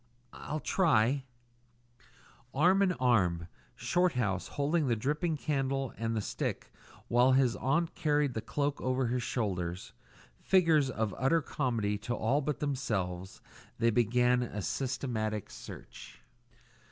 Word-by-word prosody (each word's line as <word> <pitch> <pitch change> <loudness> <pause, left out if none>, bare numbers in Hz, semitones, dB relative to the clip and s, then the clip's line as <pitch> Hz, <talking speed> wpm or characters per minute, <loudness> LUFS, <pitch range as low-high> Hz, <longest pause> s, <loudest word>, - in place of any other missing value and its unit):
"I'll 155 - -5
try 135 - +2 0.6
" 120 +1 -29
Arm 180 +7 +4
in 195 -2 +4
arm, 95 - +2 0.3
Shorthouse 125 - 0
holding 150 +1 0
the 120 - +2
dripping 150 +8 -1
candle 135 -3 -1
and 115 0 -2
the 110 - 0
stick, - - -4 0.3
while 125 +2 +4
his 130 -3 +3
aunt 165 +6 0
carried 150 -3 +1
the 110 - -3
cloak 145 +3 -2
over 130 0 0
her 125 +2 0
shoulders, 95 -7 -3 0.5
figures 165 -7 +3
of 110 -5 -2
utter 150 +5 +2
comedy 115 -9 -1
to 120 +3 -3
all 140 +4 +1
but 150 -1 -3
themselves, 100 -10 -2 0.4
they 115 0 +3
began 120 +2 +3
a 105 -4 -4
systematic 110 -5 -2
search. - - -11
130 Hz, 130 wpm, -31 LUFS, 110-145 Hz, 0.6 s, Arm